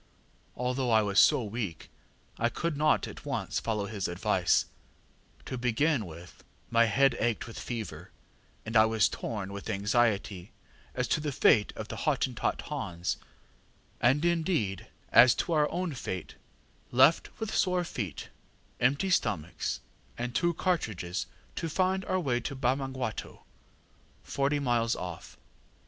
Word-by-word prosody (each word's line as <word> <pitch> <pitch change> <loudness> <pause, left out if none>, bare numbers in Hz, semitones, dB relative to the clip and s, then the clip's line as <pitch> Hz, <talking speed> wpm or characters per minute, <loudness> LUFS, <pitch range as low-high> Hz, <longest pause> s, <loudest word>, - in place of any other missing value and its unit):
ŌĆÖ 125 - -3
ŌĆ£Although 130 -2 0
I 110 -1 +6
was 100 0 +3
so 125 - +5
weak, 105 -6 -5 0.5
I 120 - +2
could 170 +4 -2
not 150 +1 +2
at - - -10
once - - -2
follow 105 -3 -1
his 100 -2 -3
advice. 95 0 +2 0.8
To 130 - -4
begin 125 - +1
with, 85 +2 -12 0.3
my 115 0 +5
head 125 +4 +3
ached 115 -1 0
with 115 - -8
fever, 115 -3 -6 0.6
and 110 +1 -5
I 110 0 +8
was 110 -2 +3
torn 100 -4 -5
with 100 +2 -7
anxiety 105 -2 0 0.4
as 125 -1 0
to - - +2
the 150 -1 -2
fate 110 -5 +4
of - - -6
the - - -5
Hottentot - - 0
Hans; 85 0 -3 0.8
and, 135 +7 +3
indeed, 165 - 0 0.2
as 120 +1 +8
to 170 - -1
our 150 -1 +3
own 180 -1 -2
fate, 95 -8 -5 0.6
left 130 +6 +4
with 220 -1 -3
sore 180 -2 +2
feet, 105 - -5 0.5
empty 140 +10 +2
stomachs, 85 - -1 0.4
and 120 0 -3
two 175 +5 +1
cartridges, 110 - -1 0.3
to 165 - -2
find 190 +3 +1
our 185 - 0
way 130 -8 0
to 140 +4 -5
Bamangwato, 130 -2 -2 0.8
forty 140 +1 0
miles 120 -4 +1
off. 90 -2 -7
120 Hz, 140 wpm, -29 LUFS, 105-145 Hz, 0.8 s, I